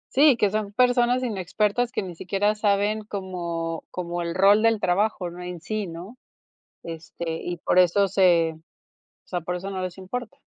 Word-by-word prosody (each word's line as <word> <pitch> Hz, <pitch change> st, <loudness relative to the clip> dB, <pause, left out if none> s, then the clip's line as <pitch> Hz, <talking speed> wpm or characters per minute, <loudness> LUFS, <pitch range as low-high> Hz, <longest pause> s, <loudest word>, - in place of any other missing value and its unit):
Sí, 280 Hz, -2 st, +6 dB
que 205 Hz, -3 st, +2 dB
son 215 Hz, -1 st, -2 dB
personas 245 Hz, +1 st, +3 dB
inexpertas 210 Hz, +2 st, 0 dB
que -, -, -2 dB
ni 180 Hz, -2 st, -7 dB
siquiera 195 Hz, +5 st, 0 dB
saben 210 Hz, 0 st, +1 dB
como 175 Hz, -5 st, -4 dB
como 175 Hz, -1 st, -4 dB
el 170 Hz, 0 st, -3 dB
rol 200 Hz, +3 st, +5 dB
del 225 Hz, -1 st, +3 dB
trabajo, 185 Hz, -1 st, 0 dB
¿no?, 180 Hz, -, -9 dB
en 180 Hz, -1 st, -6 dB
sí, 210 Hz, +3 st, -3 dB
¿no? 180 Hz, +9 st, -9 dB, 0.6 s
Este, 165 Hz, +1 st, -7 dB, 0.2 s
y 175 Hz, -1 st, -4 dB
por 180 Hz, -, +1 dB
eso 185 Hz, +2 st, +4 dB
se, 175 Hz, -4 st, +4 dB
o 160 Hz, +1 st, -23 dB, 0.5 s
sea, 180 Hz, -, -1 dB
por 175 Hz, +1 st, -4 dB
eso 190 Hz, +2 st, -5 dB
no 190 Hz, -1 st, -4 dB
les 185 Hz, 0 st, -5 dB
importa. 245 Hz, +7 st, -6 dB
190 Hz, 175 wpm, -25 LUFS, 175-215 Hz, 0.6 s, Sí